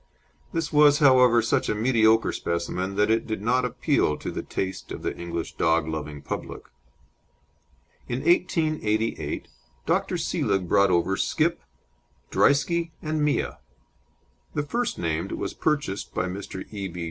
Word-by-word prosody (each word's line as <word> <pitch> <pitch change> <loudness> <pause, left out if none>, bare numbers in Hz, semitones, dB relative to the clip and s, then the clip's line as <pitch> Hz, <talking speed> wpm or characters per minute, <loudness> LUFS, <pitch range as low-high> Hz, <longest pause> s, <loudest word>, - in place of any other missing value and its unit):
This 165 -1 -2
was, 145 -1 +6
however, 125 -5 +5
such 115 - +1
a - - +1
mediocre 110 -1 +3
specimen 90 +3 -3
that 105 +2 +2
it 115 - +1
did 110 -3 -2
not 125 +3 +2
appeal 125 - +1
to - - -5
the - - -4
taste 95 -1 -4
of - - -6
the - - -2
English 85 -1 -5
dog 80 -1 +2
loving 75 -2 -5
public. - - -5 1.4
In 125 +2 -2
1888 155 -11 0 0.4
Dr. - - 0
Seelig 95 -2 -1
brought 100 +3 +4
over 90 +2 +2
Skip, 170 +2 0 0.7
Drieske, 170 +4 +2
and 155 -1 -1
Mia. 150 - 0 1.0
The 150 - 0
first 235 +11 -2
named 80 -1 -2
was - - -4
purchased 145 -11 -2
by 90 - 0
Mr. 95 0 -6
E. 100 -2 -4
B. 90 -1 -8
110 Hz, 140 wpm, -25 LUFS, 90-145 Hz, 1.4 s, was